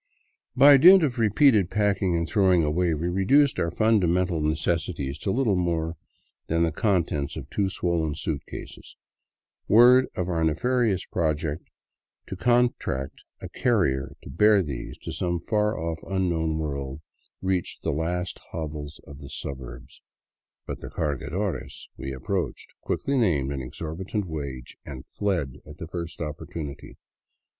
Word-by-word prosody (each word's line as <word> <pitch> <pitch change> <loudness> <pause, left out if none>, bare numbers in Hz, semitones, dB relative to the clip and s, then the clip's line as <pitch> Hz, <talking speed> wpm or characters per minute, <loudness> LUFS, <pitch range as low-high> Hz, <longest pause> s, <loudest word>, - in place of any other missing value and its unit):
By 140 0 +8
dint 180 +5 +8
of 130 -5 -1
repeated 110 - +4
packing 100 -3 +1
and 85 -1 0
throwing 95 -3 +3
away, 80 +2 +1
we 80 +3 -2
reduced 115 +11 +3
our 85 - +1
fundamental 90 -5 +2
necessities 75 -2 -1
to - - -3
little 115 -1 +2
more 85 -2 -1 0.5
than 85 +1 +1
the 80 - +1
contents 80 -6 0
of 70 -4 -7
two 100 -2 0
swollen 85 -5 -1
suitcases. 80 -2 -7 0.7
Word 125 +4 +7
of 90 - -2
our 85 -3 0
nefarious 105 +4 +1
project 80 -2 -2 0.6
to - - -6
contract 120 - 0 0.2
a - - -6
carrier 75 - 0
to - - -9
bear 105 +4 +4
these 70 -6 -6
to - - -5
some 85 -1 -2
far 105 +4 0
off, 80 0 -3
unknown 85 -5 -1
world 70 -2 -4 0.4
reached 95 -2 -2
the - - 0
last 90 +4 -2
hovels 75 -2 -6
of 70 -1 -11
the 70 -1 -10
suburbs. 65 -1 -8 0.6
But - - -6
the - - -7
cargadores 80 +6 -3
we 65 +1 -6
approached 85 +8 -4
quickly 140 -1 -1
named 75 - +1
an 70 -1 -3
exorbitant 85 - -4
wage 70 -6 -6
and 65 -3 -9
fled 85 -11 -2
at 75 0 -11
the 80 - -6
first 85 0 -6
opportunity. 75 -1 -7
85 Hz, 140 wpm, -25 LUFS, 75-100 Hz, 0.7 s, By